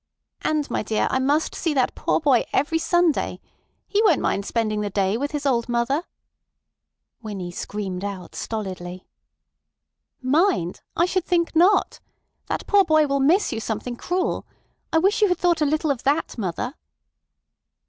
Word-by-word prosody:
"And, 305 -2 0
my - - 0
dear, 215 0 0
I 260 - +1
must 290 +4 +1
see 325 -5 -1
that 260 -2 +2
poor - - 0
boy 275 -6 +3
every 325 +4 +1
Sunday. 345 -1 +1 0.5
He 415 - +2
won't 380 -10 +4
mind 200 0 -1
spending 215 -2 0
the 205 - -2
day 195 0 +1
with 285 +5 -1
his 295 -1 -4
old 240 -3 +1
mother—" 240 +7 0 1.2
Winnie 195 -5 -5
screamed 190 0 -5
out 195 -3 -6
stolidly: 185 -4 -5 1.1
"Mind! 275 - +1 0.2
I 340 - +4
should 370 0 -1
think 340 -2 0
not. 360 +6 +3 0.5
That - - -3
poor 405 -1 +5
boy 310 -3 +4
will 280 -1 0
miss 310 +4 +3
you 225 - -2
something 225 +2 -4
cruel. 360 +8 -2 0.4
I - - +3
wish 395 +7 +2
you 420 - +6
had 360 -2 +1
thought 345 -2 +2
a 300 - +3
little 310 +1 +1
of 255 -4 -3
that, 290 +4 0
mother." 225 +5 -3
275 Hz, 160 wpm, -23 LUFS, 215-330 Hz, 1.2 s, you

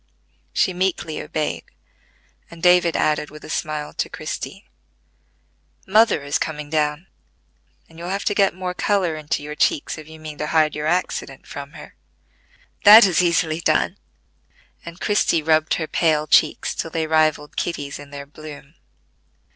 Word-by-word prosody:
She 185 - +1
meekly 180 -3 -2
obeyed; 155 -1 -3 0.8
and 170 -1 -13
David 180 -2 +4
added 150 -1 0
with 150 0 -12
a - - -7
smile 155 -2 -3
to - - -2
Christie: - - -6 1.2
"Mother 215 -6 +3
is 145 0 -1
coming 150 -2 -4
down, 150 +1 0 0.8
and 165 0 -16
you'll 175 +1 -6
have 195 +1 -3
to - - +1
get 200 -3 +2
more 185 -1 -4
color 185 -4 0
into 150 -1 -3
your 150 0 -6
checks 150 +1 0
if 155 - -11
you 160 0 -12
mean 155 -2 -9
to 150 - -2
hide 155 -1 +2
your 150 0 -3
accident 180 +3 -2
from - - -8
her." - - -12 0.9
"That 215 +2 +10
is 180 -3 +3
easily 170 -2 +1
done;" - - +1 0.9
and 170 +1 -10
Christie 205 -6 +1
rubbed 155 0 +2
her 160 - -2
pale 155 -1 +1
cheeks 155 0 +3
till 165 - -4
they 160 0 -2
rivalled 155 -2 +1
Kitty's 145 -5 -3
in 145 -1 -11
their 140 0 -8
bloom. 150 0 -12
155 Hz, 155 wpm, -21 LUFS, 150-175 Hz, 1.2 s, That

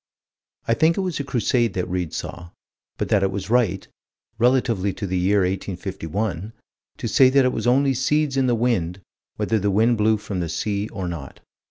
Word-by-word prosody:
I 115 - +3
think 160 +7 +3
it - - +1
was 180 -5 -2
a - - -1
Crusade 120 -4 0
that 90 - -1
Read 90 -3 -2
saw 85 -1 -6 0.5
but - - -2
that 105 - +3
it 95 - +2
was 95 +1 -5
right, 110 -7 +1 0.5
relatively 115 -6 +2
to 100 - -5
the 95 -1 -1
year 100 +3 +3
1851, 95 +1 -3 0.4
to - - -4
say 130 -1 +5
that 135 0 +4
it 125 - +1
was - - -2
only 135 +2 +3
seeds 140 +2 +1
in 135 -1 +2
the 120 - +2
wind, 100 -7 0 0.3
whether 110 - 0
the 100 +1 0
wind 110 +3 +2
blew 110 +1 +3
from 100 -2 -5
the 85 -2 -2
sea 100 +4 -2
or 95 -3 -5
not. 80 -6 -7
105 Hz, 195 wpm, -23 LUFS, 95-125 Hz, 0.5 s, say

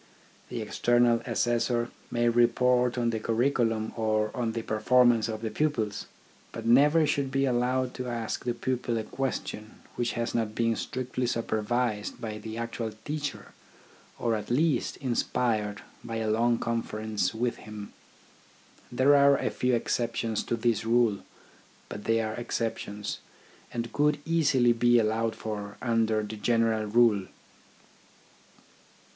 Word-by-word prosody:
The - - -4
external* 120 -1 +2
assessor 120 0 0 0.2
may 120 0 +1
report 125 +1 +3
on 120 -1 +1
the 110 - -2
curriculum 115 -1 0
or 110 -1 0
on 115 -2 -1
the 115 -1 -3
perform 120 +3 +4
ance 115 -2 0
of 110 0 -5
the 110 - -2
pupils, 115 -7 -1 0.4
but - - -7
never 145 +7 +5
should 140 -2 0
be 135 +1 +1
allowed 125 0 0
to 125 -1 -5
ask 115 -2 -3
the 120 -1 -1
pupil 120 -1 -2
a 110 - -2
question 115 -3 -4 0.2
which 120 -1 0
has 115 0 -2
not 110 -2 -1
been 115 -1 +1
strictly 125 0 -3
supervised 115 -1 -1
by 110 -2 -5
the 110 +1 -7
actual 115 -1 -4
teacher, 145 -2 -4 0.7
or 115 - 0
at 105 -1 -3
least 150 +5 +1
inspired 115 -5 -1 0.2
by 115 - -5
a 110 -1 -1
long 115 +2 +2
conference 110 -4 -2
with 120 +1 -1
him. 105 -1 -9 1.0
There 130 +4 +4
are 140 0 +6
a - - -1
few 125 -1 +1
exceptions 115 -1 -1
to - - 0
this 115 -1 0
rule, 115 -3 +2 0.7
but 105 - -7
they 115 0 +2
are 110 -1 -3
exceptions, 110 -3 -3 0.5
and 115 -1 -4
could 150 0 +2
easily 140 -7 +3
be 120 +1 +4
allowed 110 0 +1
for 105 -2 -6
under 115 -2 +1
the 105 +1 -6
general 115 0 +1
rule. 105 -3 +3
115 Hz, 140 wpm, -28 LUFS, 110-125 Hz, 1.0 s, are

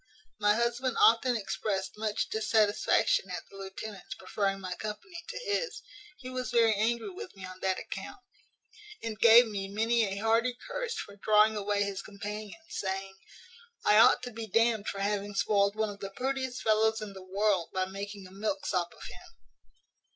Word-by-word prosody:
My 210 0 +4
husband 240 +2 0
often 235 +1 +5
expressed 195 -2 -3
much 215 0 -1
dissatisfaction 220 - +2
at - - -4
the - - -16
lieutenant's 195 +1 -7
preferring 195 -1 -2
my 185 -1 -4
company 220 - -7
to - - -5
his; 450 +3 -2 0.3
he 255 - -10
was 255 0 -3
very 230 -2 +4
angry 230 - 0
with 375 - -9
me 190 -1 -8
on 185 0 -10
that 190 -1 0
account, - - -7 0.9
and 220 -2 -4
gave 235 +2 +8
me 200 -3 -4
many 225 +3 +2
a 195 -1 -4
hearty 230 +3 +2
curse - - -3
for 200 0 -7
drawing 215 +1 +4
away 205 0 0
his 200 -1 -3
companions; 210 +7 -7
saying, 195 0 -3 0.7
`I 210 +1 +7
ought 250 - +5
to 245 - -5
be 225 0 -6
d 230 +4 +4
n'd 210 -1 -9
for 195 - -3
having 205 0 -1
spoiled 200 0 +2
one 215 -1 0
of 200 - -11
the 195 - -5
prettiest 260 +3 -3
fellows 220 0 +3
in 210 -2 -7
the 190 - -10
world, 190 -1 0
by 185 0 0
making 200 +1 -7
a 185 - -13
milksop 205 - -2
of - - -13
him.' 350 -1 -12
215 Hz, 175 wpm, -30 LUFS, 200-235 Hz, 0.9 s, gave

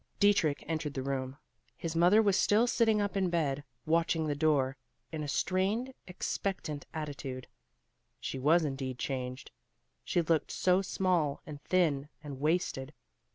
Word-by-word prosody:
Dietrich 200 -8 +3
entered 155 -3 -2
the 130 - -2
room. 135 0 -3 0.4
His 165 -1 -4
mother 180 +6 +6
was 200 -3 +3
still 210 +4 +4
sitting 225 -3 +3
up 205 -1 -1
in 190 -2 +2
bed, 145 -5 0 0.2
watching 165 0 +2
the 150 - 0
door, 145 -3 +2 0.4
in 160 -1 -4
a 150 - -3
strained, 195 - 0
expectant 180 -4 -3
attitude. 140 -5 -5 0.7
She 135 - -4
was 160 +5 +4
indeed 135 -3 -3
changed. 130 -1 -4 0.5
She 175 - +1
looked 160 -1 +1
so 185 +1 +2
small 180 -6 0
and 145 -2 -8
thin 150 -6 +2
and 140 -3 -7
wasted. 150 -3 -1
155 Hz, 145 wpm, -31 LUFS, 140-185 Hz, 0.7 s, mother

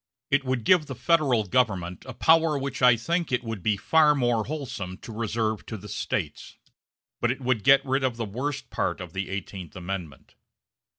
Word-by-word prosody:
It 135 0 +3
would 130 -3 -1
give 170 +2 +4
the 135 - -6
Federal 130 -4 +2
Government 95 -5 0
a 130 - -7
power 160 0 +4
which 140 0 -4
I 125 -2 +7
think 170 +8 -1
it 125 -1 0
would 115 -4 -5
be 105 +2 +1
far 150 +8 +4
more 120 -5 +1
wholesome 120 -11 -5
to 115 - -10
reserve 110 -1 -2
to 110 - -5
the 105 - -11
States; - - -4 0.6
but 120 - +1
it 130 - -1
would 125 -5 0
get 135 +4 +6
rid 135 +1 0
of 125 -3 0
the 115 - -2
worst 135 +7 -4
part - - -1
of 90 -2 -8
the 95 0 -3
Eighteenth 95 -3 -6
Amendment. 90 -5 -6
120 Hz, 190 wpm, -26 LUFS, 100-135 Hz, 0.6 s, I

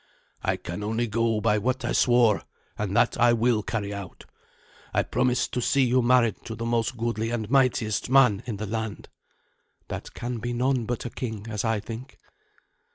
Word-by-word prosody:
"I - - 0
can 85 +4 -6
only 110 +3 0
go 115 -1 0
by 105 -1 +2
what 130 +4 -1
I - - -1
swore, 120 -4 +4 0.3
and - - -2
that - - +3
I 120 0 +5
will 115 -1 +2
carry 105 -2 -3
out. 100 -3 -8 0.7
I - - +3
promised 125 0 0
to 125 - 0
see 135 +3 +3
you 125 +1 +3
married 120 -2 +3
to 115 - -5
the 115 +1 -5
most 115 +1 0
goodly 115 -1 -1
and 115 -3 -2
mightiest 120 -5 +2
man 125 -7 +5
in 110 -4 -3
the 105 - -4
land." 110 0 -4 0.8
"That - - -6
can 120 0 -4
be 120 +2 -3
none 125 0 +1
but 120 0 -3
a 120 - -4
king, 110 -4 -5
as 105 -2 -2
I 110 -2 +1
think." 115 +5 -8
115 Hz, 185 wpm, -26 LUFS, 110-125 Hz, 0.8 s, I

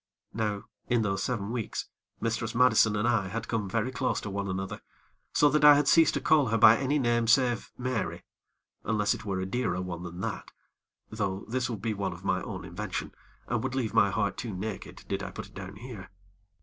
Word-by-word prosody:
Now 105 -2 -2 0.2
in 120 -2 +2
those 95 -2 -1
seven 105 -1 -2
weeks, 120 -3 -3 0.3
Mistress 115 0 -2
Madison 115 -3 +5
and 105 +3 +1
I 115 -5 +2
had 115 +3 -4
come 110 -4 -2
very 115 +5 0
close 125 -3 -1
to 105 - -5
one 100 0 -3
another, 95 +1 -4 0.5
so 145 - +4
that 150 +1 +2
I 150 0 +10
had 145 -1 +2
ceased 165 +1 +5
to - - +1
call 150 -4 +4
her 115 0 +1
by 110 +1 +8
any 135 +4 0
name 120 -3 +1
save 125 -1 +3
Mary, 125 -3 -2 0.6
unless 105 -2 +1
it - - -8
were 95 -2 -2
a 95 - -2
dearer 95 -3 -1
one 90 -2 -5
than 90 0 -7
that; - - -4 0.6
though 100 -3 -2
this 125 +2 -1
would 110 -4 -5
be 115 - 0
one 100 -1 -2
of - - -12
my - - +1
own - - -6
invention, - - -5 0.3
and 120 -1 -1
would 130 0 -2
leave 120 -5 -1
my 100 -2 +5
heart 100 +1 -1
too 110 -5 -4
naked 100 +2 -6
did - - -2
I - - -4
put - - -7
it - - -23
down 95 0 -8
here. 110 -3 -9
110 Hz, 215 wpm, -29 LUFS, 100-125 Hz, 0.6 s, I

